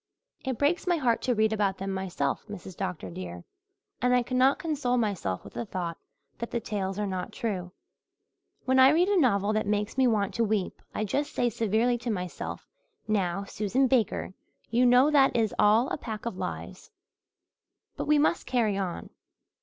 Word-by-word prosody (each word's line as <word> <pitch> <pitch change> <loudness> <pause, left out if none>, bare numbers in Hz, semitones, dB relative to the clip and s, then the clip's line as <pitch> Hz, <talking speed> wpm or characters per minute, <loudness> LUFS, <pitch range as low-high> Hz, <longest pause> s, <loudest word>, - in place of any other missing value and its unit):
It 260 -4 -2
breaks 310 +6 +1
my 350 -1 +3
heart 245 -6 +1
to 250 -2 +1
read 220 0 +2
about 200 -3 0
them 195 0 -4
myself, 190 -7 -2
Mrs. 190 -3 -8
Dr. 180 - -4
dear, 90 0 -7 0.6
and 250 +1 +3
I 250 - +3
cannot 255 +3 +3
console 285 -6 -1
myself 200 - -1
with - - -12
the - - -3
thought 180 -6 -4 0.4
that 235 - -4
the 235 - -1
tales 195 -3 -3
are 210 - -1
not 185 -2 -4
true. 190 -7 -3 0.9
When 260 0 +3
I 260 +1 +9
read 340 +6 +3
a 405 -2 +3
novel 205 -5 +2
that 215 -1 0
makes 210 +4 -1
me 260 - +5
want 210 -4 +1
to 235 - +1
weep 210 -3 -1
I - - 0
just 280 +8 -2
say 245 -1 +1
severely 225 +3 +1
to 240 +1 -4
myself, 180 -5 -4 0.4
'Now, 195 -3 0
Susan 215 +6 0
Baker, 245 -7 +1 0.4
you 245 +2 +4
know 250 +4 +5
that 275 -2 +4
is 225 -3 +1
all 215 +4 +5
a - - -2
pack 220 -4 -6
of 235 - -3
lies.' - - -6 1.1
But - - -4
we 300 0 +5
must 310 +3 +1
carry 225 -6 +1
on. 180 -3 -4
220 Hz, 185 wpm, -28 LUFS, 195-255 Hz, 1.1 s, I